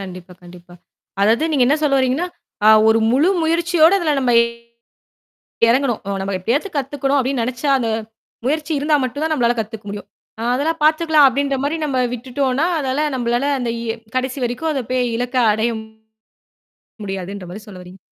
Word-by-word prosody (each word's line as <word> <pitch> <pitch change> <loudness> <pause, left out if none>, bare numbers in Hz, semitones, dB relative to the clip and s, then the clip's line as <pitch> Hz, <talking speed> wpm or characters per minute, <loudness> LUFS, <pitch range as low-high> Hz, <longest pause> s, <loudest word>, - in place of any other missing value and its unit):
கண்டிப்பா, 185 -1 -9
கண்டிப்பா. 175 0 -14 0.5
அதாவது 235 +10 +2
நீங்க 260 -4 +3
என்ன 285 +4 +3
சொல்ல 275 -2 +3
வர்றீங்கன்னா, 265 +7 0 0.4
அ - - +8 0.2
ஒரு 225 0 +4
முழு 285 +8 +3
முயற்சியோட 335 +1 +3
அதுல 310 -4 0
நம்ப 250 -2 +1 1.4
இறங்கணும். 250 -2 +1 0.2
"நம்ப 195 0 -3
எப்படியாவது 270 - -1
கத்துக்கணும்" 275 +1 -1
அப்படின்னு 260 -1 -1
நெனைச்சா, 255 +4 -2
அந்த 230 - -1 0.6
முயற்சி 305 +3 -1
இருந்தா 300 +1 +2
மட்டும் 285 +4 -3
தான் 320 - -1
நம்பளால 240 -4 +1
கத்துக்க 220 -1 -6
முடியும். 205 0 -7 0.3
"அ, - - -4
அதெல்லாம் 320 +3 -1
பாத்துக்கலாம்." 310 -2 +5
அப்படின்ற 275 +1 -1
மாரி 310 +3 -1
நம்ப 265 -3 -1
விட்டுட்டோம்ன்னா, 260 +5 -1
அதால 285 +2 -1
நம்பளால 240 +4 0
அந்த 240 -2 -2
இ - - -5 0.3
கடைசி 260 +1 -2
வரைக்கும் 305 +7 -2
அதைப் 255 -4 -4
போயி 250 -1 +1
இலக்க 245 +1 -2 0.2
அடைய 220 +2 0 1.3
முடியாதுன்ற 195 0 -6
மாரி 210 +3 -9
சொல்ல 185 -3 -10
வர்றீங்க. 180 +2 -14
260 Hz, 160 wpm, -19 LUFS, 225-295 Hz, 1.4 s, அ